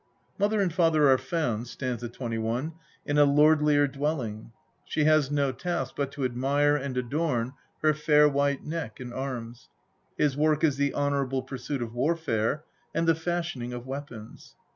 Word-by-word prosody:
Mother 205 +1 +2
and 180 -4 0
father 160 -5 +4
are 130 - +4
found 125 -10 -2
(st. 120 -2 -4
21) 120 +5 -3 0.3
in 145 - 0
a - - +8
lordlier 150 0 +4
dwelling; 135 -6 -3 0.3
she 155 - -1
has 155 -2 +4
no 140 -2 +1
task 135 -1 -3
but 140 -1 -2
to 140 - -2
admire 140 +4 +2
and 135 -3 -3
adorn 125 -1 -1 0.3
her 155 -1 +5
fair 150 0 +4
white 140 -1 +1
neck 155 -8 -5
and 125 -2 -7
arms; 120 -3 -6 0.5
his 145 -3 +2
work 155 +1 +2
is 145 -4 +3
the 140 0 0
honourable 140 -2 0
pursuit 130 0 -4
of 115 -1 -7
warfare, 145 -1 0 0.3
and 165 +1 +1
the 165 - +6
fashioning 160 -7 -3
of 120 0 -6
weapons. 130 -5 -8
140 Hz, 160 wpm, -27 LUFS, 125-155 Hz, 0.5 s, a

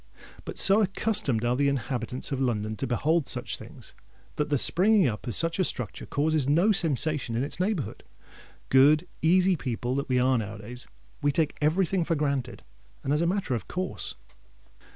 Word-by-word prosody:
But - - -7
so 195 +3 +6
accustomed 195 - 0
are 120 +1 +1
the 140 +2 +1
inhabitants 125 -1 -3
of 135 -1 -2
London 110 -4 -1
to - - -3
behold 150 +5 0
such - - -3
things, - - -12 0.4
that 150 - -2
the 145 - +2
springing 190 - +4
up 110 +1 -5
of 120 - -3
such 165 +2 +1
a - - +4
structure 125 - -2
causes 150 -1 0
no 175 +9 +3
sensation 155 - +1
in 120 - 0
its 145 - -4
neighbourhood: 185 - -2 0.7
good, 150 +6 +5
easy 185 +3 +3
people 125 -4 -3
that 140 - -3
we 130 - +2
are 125 0 +2
now 105 0 -5
a - - -10
days—we 105 - -6
take 155 0 0
every 160 +6 +2
thing 180 +1 -1
for 165 0 -1
granted 140 -4 -2 0.4
and 135 - 0
as 150 - +1
a 170 - +1
matter 185 -6 -1
of 115 - -4
course! 185 +1 -4
145 Hz, 185 wpm, -26 LUFS, 125-170 Hz, 0.7 s, so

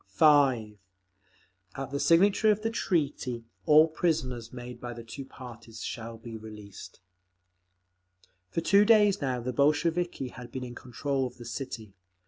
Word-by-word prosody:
5. 135 - +3 1.0
At 135 -1 -5
the 140 - -2
signature 195 +7 +4
of 210 0 +2
the 225 - 0
treaty, 140 - -1 0.2
all 155 +1 +7
prisoners 130 -8 -1
made 125 -1 -9
by 120 0 -5
the 120 0 -9
two 125 +4 -8
parties 115 -4 -10
shall 115 0 -6
be 115 0 -9
released…. 105 -4 -11 1.5
For 165 - -2
two 200 +4 +5
days 210 -3 +5
now 130 -3 -1
the 125 +2 -3
Bolsheviki 155 +1 +1
had 120 -1 -11
been 130 +1 -5
in 120 -1 -7
control 135 +2 -2
of 125 - -13
the 120 - -10
city. 115 -4 -6
130 Hz, 145 wpm, -29 LUFS, 115-160 Hz, 1.5 s, all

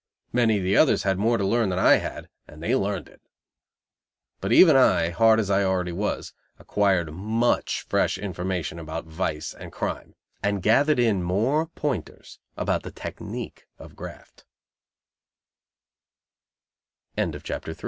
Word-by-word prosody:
Many 115 -3 +3
of 95 - -3
the 95 +2 +1
others 155 - +4
had 95 -1 0
more 115 +3 +2
to 100 - -1
learn 115 +1 +2
than 90 - -2
I 95 - +6
had, - - -6 0.2
and 75 +2 -12
they 120 +8 +1
learned 100 -5 -2
it. - - -20 1.2
But 95 - -3
even 160 +4 +7
I, 85 -10 +4
hard 110 +4 +4
as 100 -3 -1
I 100 +1 +3
already 95 -2 0
was, 100 +5 -3 0.2
acquired 95 -6 0
much 110 +7 0
fresh - - +1
information 90 -3 -4
about 80 0 -6
vice 80 -1 -3
and - - -11
crime; - - -5 0.3
and 100 -2 -1
gathered 145 +7 +4
in 115 -6 +2
more 115 - +1
pointers 150 -3 -5 0.2
about - - 0
the - - -8
tec - - -8
100 Hz, 130 wpm, -25 LUFS, 90-115 Hz, 1.2 s, even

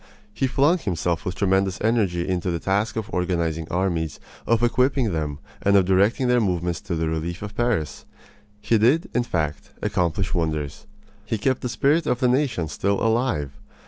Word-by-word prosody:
He 135 - 0
flung 145 +7 +3
himself 85 - -1
with 90 - -3
tremendous 95 -1 +1
energy 100 -6 +1
into 90 -1 -1
the 85 - 0
task 100 +5 0
of 110 0 -4
organizing 85 -3 -1
armies, 85 -3 -1 0.3
of 115 0 +2
equipping 125 -1 +2
them, 75 -3 -2 0.2
and 100 0 +4
of 95 - +4
directing 100 +7 +3
their 125 0 +4
movements 90 -4 -1
for 90 - -4
the 80 0 -1
relief 80 +3 -3
of 105 0 -7
Paris. 115 - -1 0.5
He 105 +2 +2
did, 130 +10 +3
in 120 - +2
fact, 80 -10 -2
accomplish 90 +2 -1
wonders. 75 -5 -2 0.4
He 110 +1 -2
kept 130 +4 0
the 125 - -3
spirit 150 +6 +2
of 125 - +1
the 130 - +3
nation 125 - +1
still 100 +6 -1
alive. 115 - 0
95 Hz, 175 wpm, -23 LUFS, 85-120 Hz, 0.5 s, and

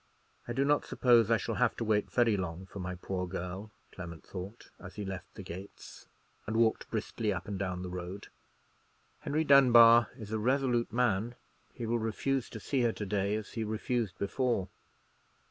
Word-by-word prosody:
"I 120 - -3
do 135 +3 +1
not 145 +1 +3
suppose 120 -3 +4
I 115 - +4
shall 100 - -3
have 125 - +3
to - - -3
wait 105 -2 +1
very 120 -3 +3
long 90 -1 -4
for 100 - -9
my 90 0 -4
poor 90 +1 -4
girl," 90 +4 -5 0.2
Clement 85 -3 -8
thought, 95 +5 -8
as 90 - -10
he 105 - -5
left 95 -1 -6
the - - -8
gates, 95 +4 -10 0.4
and 110 +1 -1
walked 115 -1 +2
briskly 110 0 -2
up 90 -4 -4
and 100 -2 -4
down 90 -2 -3
the 90 - -5
road. 90 +2 -6 0.9
"Henry 155 +2 0
Dunbar 120 -5 +7
is 110 -4 -9
a 110 - -1
resolute 125 0 +1
man; 120 -1 +1 0.4
he 120 - -4
will 115 +1 0
refuse 120 +4 -1
to 110 - -8
see 130 +5 -1
her 120 -1 +3
to 105 - -5
day, 100 +1 0
as 110 -2 -5
he 115 - -3
refused 110 -2 -2
before." 105 -1 -1
110 Hz, 185 wpm, -31 LUFS, 95-120 Hz, 0.9 s, Dunbar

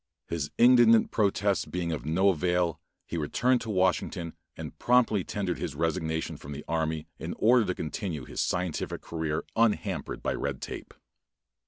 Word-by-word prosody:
His 80 -4 -2
indignant 120 -2 +6
protests 100 -1 +1
being 85 -2 -3
of 75 -3 -4
no 95 +5 +3
avail, 90 -1 +1 0.3
he 85 - -4
returned 120 - +1
to 115 - -6
Washington 90 -3 0 0.2
and - - -8
promptly 120 -5 +3
tendered 95 -2 -3
his - - -4
resignation 80 0 -1
from 70 - -8
the 75 - -8
army 80 -1 -1
in - - -5
order 120 0 +5
to 90 - -1
continue 80 - -4
his - - -3
scientific 90 -3 -2
career 80 -2 -3
unhampered 105 -5 0
by - - 0
red 70 -2 -3
tape. - - -7
90 Hz, 155 wpm, -28 LUFS, 80-105 Hz, 0.3 s, indignant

